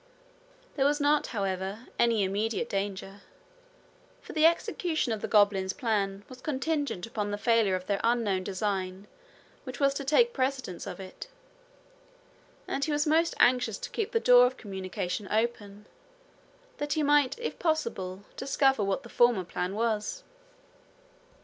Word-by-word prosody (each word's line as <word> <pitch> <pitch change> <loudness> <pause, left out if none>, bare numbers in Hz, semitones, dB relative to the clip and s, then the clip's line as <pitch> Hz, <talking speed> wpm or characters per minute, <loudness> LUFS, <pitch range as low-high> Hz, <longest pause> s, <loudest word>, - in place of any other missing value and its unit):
There 270 - +2
was 295 +1 +1
not, 290 +1 +2
however, 195 +1 -3
any 230 -3 +3
immediate 215 +5 -1
danger, 195 -1 -4 1.0
for - - -11
the 315 0 +6
execution 330 -4 0
of 215 - -5
the - - -3
goblins' 200 -3 +3
plan 200 -4 -1
was 255 -1 -12
contingent 290 - -2
upon 215 -3 -3
the 205 - -2
failure 225 -3 +2
of 185 0 -5
that 200 0 -1
unknown 225 -5 +1
design 190 -1 -3 0.6
which 255 -3 -8
was 275 -1 +3
to 275 - -4
take 465 - +3
precedence 260 -8 -2
of - - -7
it; 190 - -9 1.4
and 275 - -2
he 310 - 0
was 295 0 +1
most 325 +2 +2
anxious 245 -4 +3
to - - -7
keep 445 -1 -2
the 455 - +2
door 250 - +7
of 255 +1 -6
communication 190 -1 -4
open, 210 -2 -2 0.9
that 290 0 -1
he 310 - 0
might 290 - +3
if 475 - -5
possible 215 - -2
discover 270 -3 +2
what 195 -1 -1
the - - -10
former 240 -4 +3
plan 180 +2 -4
was. 225 - -1
230 Hz, 150 wpm, -28 LUFS, 195-275 Hz, 1.4 s, door